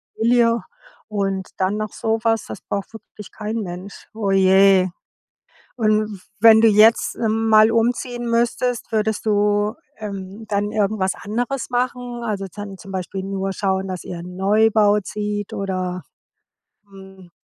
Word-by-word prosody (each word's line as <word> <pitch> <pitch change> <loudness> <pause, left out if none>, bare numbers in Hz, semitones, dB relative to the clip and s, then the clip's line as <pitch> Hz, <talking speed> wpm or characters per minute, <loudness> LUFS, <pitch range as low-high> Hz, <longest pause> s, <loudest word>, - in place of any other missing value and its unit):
Familie 230 0 +3 0.5
und 195 -2 -2
dann 190 +2 0
noch 215 -1 -3
sowas, 225 0 0
das - - -8
braucht 200 +2 -5
wirklich 210 -1 -12
kein 215 +1 -4
Mensch. 185 -1 -7
Oh 215 -3 -2
je. 190 0 +5 0.9
Und, 215 -4 0 0.2
wenn 220 0 +8
du 225 - +6
jetzt, 220 +2 +4
ähm, 225 0 0
mal 215 0 +6
umziehen 240 +1 0
müsstest, 240 +1 0
würdest 220 0 -1
du, 205 +1 +2 0.2
ähm, 200 0 -7
dann 205 0 -1
irgendwas 200 -2 0
anderes 245 +5 -3
machen? 245 -1 -2
Also, 200 -3 -3
dann 205 -2 -8
zum 195 - -12
Beispiel 190 +1 -4
nur 195 0 -3
schauen, 190 0 -1
dass 185 -1 -5
ihr 175 - -6
in 175 - -8
'n - - -11
Neubau 210 +1 +3
zieht 205 0 -4
oder, 185 -2 -3 0.9
hm 190 -2 -14
210 Hz, 140 wpm, -21 LUFS, 195-225 Hz, 0.9 s, wenn